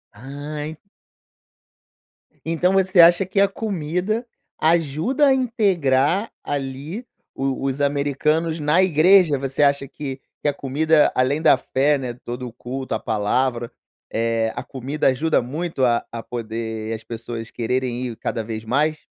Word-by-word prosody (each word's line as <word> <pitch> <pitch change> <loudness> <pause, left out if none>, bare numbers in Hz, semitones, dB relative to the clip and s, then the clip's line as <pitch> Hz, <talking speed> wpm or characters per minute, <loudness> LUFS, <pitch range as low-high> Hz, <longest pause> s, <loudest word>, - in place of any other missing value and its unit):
Ah, 120 +6 -11 0.4
en 155 +1 -7 1.7
então 165 +3 +1
você 190 -1 +3
acha 175 +3 +6
que 190 +2 -1
a 200 - +5
comida 195 +2 -2 0.3
ajuda 165 - +2
a 270 - +5
integrar, 195 - +1
ali, 145 - -4 0.3
o 135 0 -2
os 135 +1 -1
americanos 145 +3 0
na 150 +4 +3
igreja? 175 -2 +5
Você 135 +2 0
acha 140 -1 +2
que 135 -1 -6 0.2
que 150 - +1
a - - -1
comida, 150 +4 +2
além 135 +4 +1
da 160 - +6
fé, 140 +2 +1
né, 125 -3 -4
todo 120 +1 -5
o - - -9
culto, 130 +2 -5
a 110 - -1
palavra, 120 +3 0 0.4
eh, 115 0 0
a - - -1
comida 135 +3 -2
ajuda 150 +5 +2
muito 145 +2 -2
a 120 -1 +1
a 115 - -5
poder 110 -1 -4
as 110 - -5
pessoas 115 0 -6
quererem 125 +1 -2
ir 115 -2 -7
cada 115 - -3
vez 110 0 -6
mais? 150 +6 0
140 Hz, 145 wpm, -22 LUFS, 125-165 Hz, 1.7 s, acha